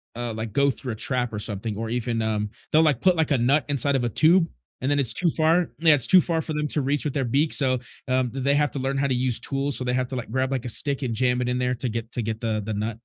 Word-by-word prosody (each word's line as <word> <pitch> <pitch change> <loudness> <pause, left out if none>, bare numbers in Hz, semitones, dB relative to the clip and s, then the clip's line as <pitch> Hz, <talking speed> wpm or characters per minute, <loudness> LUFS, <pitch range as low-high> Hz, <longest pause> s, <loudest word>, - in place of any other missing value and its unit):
uh, 120 -1 -4
like, 110 -1 -6
go 140 +1 +3
through 130 -1 -4
a - - -7
trap 125 0 -2
or 105 - -4
something 105 0 -3
or 110 +1 -5
even, 115 -1 -2
um 105 -1 -2 0.2
they'll, 160 +1 +4
like, 145 -5 +1
put, 185 -1 +3
like, 160 -2 0
a 135 - +3
nut 140 +5 +2
inside 140 0 +1
of 125 - 0
a 120 - 0
tube, 165 - +3 0.3
and 130 - -1
then 145 - +1
it's 120 -5 +3
too 175 +7 0
far 165 +2 +2
Yeah, 160 -2 +5
it's 130 - +3
too 185 -2 +6
far 165 -2 +1
for 160 - -2
them 150 0 -2
to 150 - +3
reach 140 +2 0
with 145 - -2
their 135 - 0
beak, 140 +6 0
so, 130 -3 +4 0.3
um, 130 -1 0
the 135 - -6
they 140 +2 +2
have 150 0 +2
to 140 - -4
learn 135 +1 -2
how 140 - +1
to 130 - 0
use 125 -1 +1
tools, 140 +1 -1
so 130 - -1
they 125 0 -2
have 130 0 0
to, 130 - -3
like, 120 - -6
grab, 130 +1 -1
like, 130 -2 -3
a - - -4
stick 140 +5 0
and 120 -4 -3
jam 125 +1 +1
it 125 - -2
in 125 - -1
there 125 0 0
to 125 0 -1
get 115 +1 -5
to 120 - -2
get 110 0 -4
the 110 -2 -2
the 110 - -4
nut. 105 +2 -2
130 Hz, 315 wpm, -23 LUFS, 115-145 Hz, 0.3 s, too